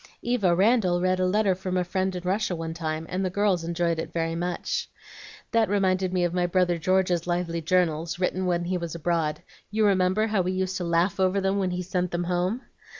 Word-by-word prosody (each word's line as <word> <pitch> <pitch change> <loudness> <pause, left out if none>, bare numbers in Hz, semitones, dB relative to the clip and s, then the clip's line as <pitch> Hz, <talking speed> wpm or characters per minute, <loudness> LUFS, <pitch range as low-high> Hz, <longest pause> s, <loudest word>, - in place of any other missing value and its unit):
Eva 215 -8 +2
Randal 190 -2 +3
read 185 +1 +1
a 185 - +2
letter 200 0 +2
from 185 0 -3
a 180 - +2
friend 185 +1 -1
in 180 - -5
Russia 190 0 0
one 165 -1 -4
time, 160 -1 -3
and 185 +1 -2
the 185 - 0
girls 195 -2 +1
enjoyed 170 0 -1
it - - -4
very 165 -1 -1
much. 175 +1 -2 0.6
That 225 -3 +3
reminded 190 -2 +1
me 180 -1 +1
of 175 -1 0
my 180 -1 +1
brother 175 -1 +1
George's 180 -1 +1
lively 175 -1 -1
journals, 165 -1 +1
written 185 0 -1
when 175 -1 +1
he 180 +1 -1
was 170 -1 -5
abroad. 165 -2 -1 0.3
You 215 +1 +1
remember 190 +1 +3
how 215 -3 +1
we 185 +1 -1
used 185 0 -1
to 180 - -3
laugh 170 +3 +1
over 190 +1 +2
them 195 +1 0
when 190 -2 0
he 180 0 -3
sent 180 0 -1
them 175 +1 -2
home? 180 +7 -1
180 Hz, 215 wpm, -26 LUFS, 170-190 Hz, 0.6 s, Randal